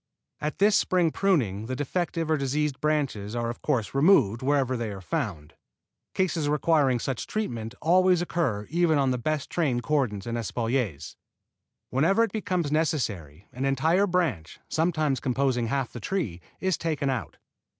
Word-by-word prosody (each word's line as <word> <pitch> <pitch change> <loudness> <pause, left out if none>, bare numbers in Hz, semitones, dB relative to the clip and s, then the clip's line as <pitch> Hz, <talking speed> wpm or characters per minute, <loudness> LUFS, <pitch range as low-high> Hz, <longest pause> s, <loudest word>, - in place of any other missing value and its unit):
At 150 +1 -3
this 205 +1 +4
spring 175 -3 +2
pruning 115 - +1
the 130 - -3
defective 165 +3 -2
or - - +4
diseased 145 0 -1
branches 135 -9 -1
are 120 0 -1
of 120 - -11
course 125 -9 -1
removed 135 - +4
wherever 135 -1 +1
they 115 -2 -3
are 100 -2 -6
found. 95 - -4 0.6
Cases 165 -5 0
requiring 150 -3 +3
such 125 +1 -3
treatment 120 - -3
always 180 +2 +4
occur 165 -12 -1
even 170 -2 +3
on 135 -2 +2
the 125 - -1
best 155 +3 -2
trained 135 -8 0
cordons 120 -9 0
and 115 0 -2
espaliers. 115 - -2 0.7
Whenever 165 - +3
it 230 - -1
becomes 180 -8 -1
necessary 105 - -1
an 130 - -4
entire 160 +9 +2
branch, 165 - -1
sometimes 155 -5 0
composing 130 -2 0
half 135 0 -2
the 120 - -6
tree, 115 - -3 0.2
is 190 -2 0
taken 150 -4 -1
out. 115 - -4
140 Hz, 155 wpm, -26 LUFS, 115-165 Hz, 0.7 s, this